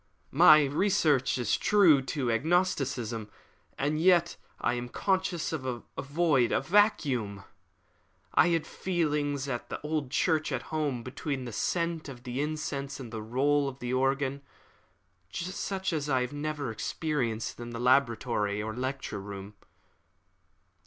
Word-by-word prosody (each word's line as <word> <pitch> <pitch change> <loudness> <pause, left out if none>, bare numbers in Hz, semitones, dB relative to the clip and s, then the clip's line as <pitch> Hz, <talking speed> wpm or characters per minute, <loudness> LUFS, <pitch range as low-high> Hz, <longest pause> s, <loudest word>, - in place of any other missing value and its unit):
"My 155 0 +7
reason 150 -2 +2 0.2
is 120 -4 +1
true 180 -10 +5
to 135 -2 -2
agnosticism, 125 - 0 0.5
and 150 +3 0
yet 175 -1 +4 0.2
I 120 - +1
am 120 0 -4
conscious 190 0 -1
of 155 -5 -3
a 125 -2 -5
void 140 -4 +2
a - - +3
vacuum. 140 - +1 0.9
I - - +5
had 165 -2 +1
feelings 150 -6 -1
at 120 -3 -4
the - - -4
old 150 -3 -2
church 155 +2 +1
at 130 -3 -2
home 145 -6 -1
between 135 +1 -4
the 120 - -6
scent 170 - -1
of 125 -2 -10
the 125 +2 -3
incense 145 -2 -3
and 120 -3 -8
the 110 - -4
roll 140 +5 +1
of 130 - -10
the 125 -1 -4
organ, 135 +1 0 0.9
such 190 +1 -3
as 150 -2 -2
I 130 -2 +2
have 125 +2 -3
never 145 -3 -3
experienced 120 -2 -2
in 120 0 -6
the 120 0 -6
laboratory 115 -5 +2
or 110 +1 -3
the 125 - -6
lecture 130 -6 -3
room." 100 0 -8
140 Hz, 145 wpm, -29 LUFS, 120-155 Hz, 0.9 s, My